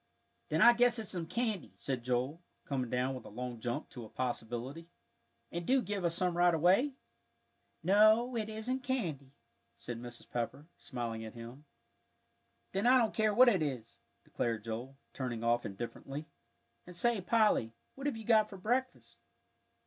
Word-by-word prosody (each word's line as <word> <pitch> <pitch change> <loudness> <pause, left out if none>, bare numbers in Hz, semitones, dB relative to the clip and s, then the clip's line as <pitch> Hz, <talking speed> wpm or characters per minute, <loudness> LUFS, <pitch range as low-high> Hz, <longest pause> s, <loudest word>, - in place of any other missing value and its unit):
"Then - - +3
I 240 - +9
guess 240 0 +3
it's 220 -3 -3
some 170 -3 -3
candy," 220 -2 -2
said 130 -3 -3
Joel, 125 +6 -1 0.2
coming 130 -4 -2
down 125 +2 0
with 130 -3 -7
a - - -10
long 120 +2 -5
jump 120 +1 -3
to 125 - -8
a 110 - -10
possibility; 125 +5 -4 0.6
"and 170 +1 -3
do 265 +9 +3
give 205 -4 -3
us 170 -1 +1
some 180 -1 +1
right 175 -1 +4
away." 190 - +4 0.9
"No, 215 +5 +5
it 220 -2 -2
isn't 220 +4 -2
candy," 170 - -3 0.5
said 120 -1 -6
Mrs. 120 -1 -8
Pepper, 120 +5 -3
smiling 115 -3 -5
at 110 0 -8
him. 120 +5 -10 1.1
"Then 195 +5 +1
I 255 +1 +7
don't 230 -3 +2
care 215 -1 +2
what 250 +5 +7
it 200 -8 +4
is," 130 -7 -4 0.2
declared 115 -3 -2
Joel, 120 +4 -5 0.2
turning 120 -4 -3
off 120 +1 +2
indifferently; 120 +8 -6 0.6
"and 180 - -10
say, 230 +3 +2
Polly, 210 - +3 0.2
what 275 +1 -4
have 270 -6 -1
you 220 - -8
got 215 -2 +4
for 195 - -9
breakfast?" 250 +7 -2
165 Hz, 165 wpm, -33 LUFS, -, 1.1 s, I